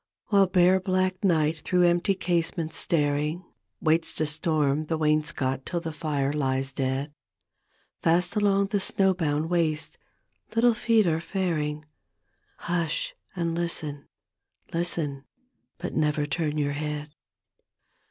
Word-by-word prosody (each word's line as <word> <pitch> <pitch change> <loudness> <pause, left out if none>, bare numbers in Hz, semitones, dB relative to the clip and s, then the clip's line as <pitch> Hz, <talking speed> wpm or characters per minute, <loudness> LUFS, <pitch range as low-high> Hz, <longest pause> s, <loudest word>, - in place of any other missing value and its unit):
While 200 -3 +5
bare 180 0 +4
black 185 0 0
night 160 -4 +2
through 180 +3 +2
empty 175 +3 +3
casements 170 -3 -1
staring 150 +2 0 0.4
Waits 160 +1 +2
to 155 - 0
storm 150 -1 +1
the 160 - 0
wainscot 150 -4 0
till 175 - -2
the 165 -2 -5
fire 145 -3 -1
lies 135 -2 -1
dead, 135 +2 -2 0.9
Fast 175 +3 +2
along 200 -1 +2
the 205 -1 +1
snowbound 170 -6 +1
waste 160 -3 0 0.6
little 235 +1 +5
feet 225 -1 +3
arc 165 -1 +1
faring 160 -5 -2 0.4
— - - -43
Hush 170 -2 -1 0.2
and 170 -2 -1
listen 160 -4 -3 0.3
— - - -30
listen 165 -5 -2 0.3
— - - -50
but 180 - -5
never 150 -1 +1
turn 150 +1 -2
your 145 -1 0
head. 150 0 -4
160 Hz, 130 wpm, -26 LUFS, 150-180 Hz, 0.9 s, While